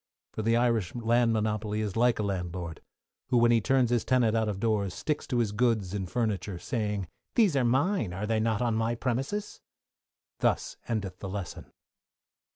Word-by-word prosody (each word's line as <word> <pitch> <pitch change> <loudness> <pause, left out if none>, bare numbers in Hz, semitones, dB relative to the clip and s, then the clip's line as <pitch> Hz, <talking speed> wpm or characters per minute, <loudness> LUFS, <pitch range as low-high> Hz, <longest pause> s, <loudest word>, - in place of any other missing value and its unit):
For - - -3
the 115 +2 +2
Irish 115 -6 +1
land 120 0 +2
monopoly 110 -1 -1
is 105 -3 -3
like 120 +1 +3
a 105 - -1
landlord, 90 -4 -4 0.5
who, 125 - +3
when 120 0 +5
he 115 -1 +4
turns 130 +1 +2
his 120 -2 +2
tenant 120 -4 +2
out 110 -1 +1
of 100 -2 -3
doors, 105 -4 0
stick 150 -1 -1
to 125 - -1
his 115 -4 +1
goods 105 -4 +1
and 95 -3 -3
furniture, 100 -5 -1
saying, 105 -2 -2 0.3
these 210 -10 +4
are 135 - +3
mine, 130 - +1
are 95 +4 -3
they 110 0 +1
not 110 +1 +1
on 120 -2 +1
my 115 +1 0
premises? 135 - -3 0.8
Thus - - 0
endeth 100 -5 -3
the 95 - -5
Lesson. 95 -3 -6
110 Hz, 180 wpm, -29 LUFS, 100-120 Hz, 0.8 s, when